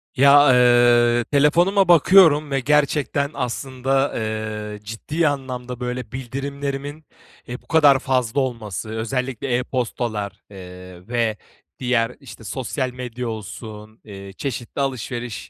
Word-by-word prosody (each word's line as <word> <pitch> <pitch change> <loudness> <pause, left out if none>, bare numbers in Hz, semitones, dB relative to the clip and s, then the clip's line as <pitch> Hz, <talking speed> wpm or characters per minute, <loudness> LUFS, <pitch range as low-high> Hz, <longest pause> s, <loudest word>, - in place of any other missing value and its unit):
Ya, 140 0 +6
eee, 120 -1 +4
telefonuma 175 +7 +3
bakıyorum 165 -3 +5
ve 135 - +1
gerçekten 145 +1 +1
aslında, 135 +2 -1
eee, 110 -1 -4
ciddi 150 +10 -2
anlamda, 125 -3 -4
böyle, 125 0 -5
bildirimlerimin, 140 +3 -5 0.4
eee, 125 +1 -7
bu - - -30
kadar 145 -4 +5
fazla 130 -2 0
olması, 110 -5 -4
özellikle 125 +3 -3
e-postalar, 120 -5 -3
eee, 90 -1 -12
ve 115 -2 -1 0.4
diğer, 125 -2 0
işte, 135 -4 -13
sosyal 130 +4 -3
medya 125 -1 -6
olsun, 110 +1 -9
eee, 100 -2 -10
çeşitli 135 -1 -4
alışveriş, 125 -4 -4
125 Hz, 110 wpm, -21 LUFS, 115-140 Hz, 0.4 s, Ya